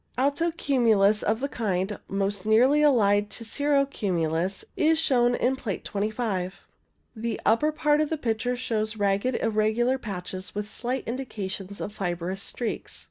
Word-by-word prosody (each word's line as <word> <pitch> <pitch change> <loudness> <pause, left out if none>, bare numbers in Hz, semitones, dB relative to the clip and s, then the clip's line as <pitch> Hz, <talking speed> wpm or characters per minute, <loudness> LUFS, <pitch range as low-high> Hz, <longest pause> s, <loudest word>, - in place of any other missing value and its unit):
Alto 285 +6 +2
cumulus 225 -10 +3
of 220 +3 0
the 280 - 0
kind 200 -5 -2
most 195 0 -1
nearly 250 +7 +4
allied 205 -8 +4
to 230 - -6
cirro 285 +3 +2
cumulus 180 - -1
is 320 +1 +3
shown 245 -6 +3
in 255 +2 +1
Plate 220 -7 -5
25. 205 -3 -2 0.5
The 225 0 -3
upper 300 +8 +3
part 300 0 +2
of 305 - 0
the 320 - -1
picture 245 -1 -1
shows 220 -3 -2
ragged, 200 +5 +1
irregular 225 +4 +1
patches, 185 -4 -6
with 210 0 -3
slight 245 +4 -3
indications 200 -6 -5
of 205 - -5
fibrous 180 -1 -3
streaks. 235 +2 -4
220 Hz, 145 wpm, -26 LUFS, 200-260 Hz, 0.5 s, nearly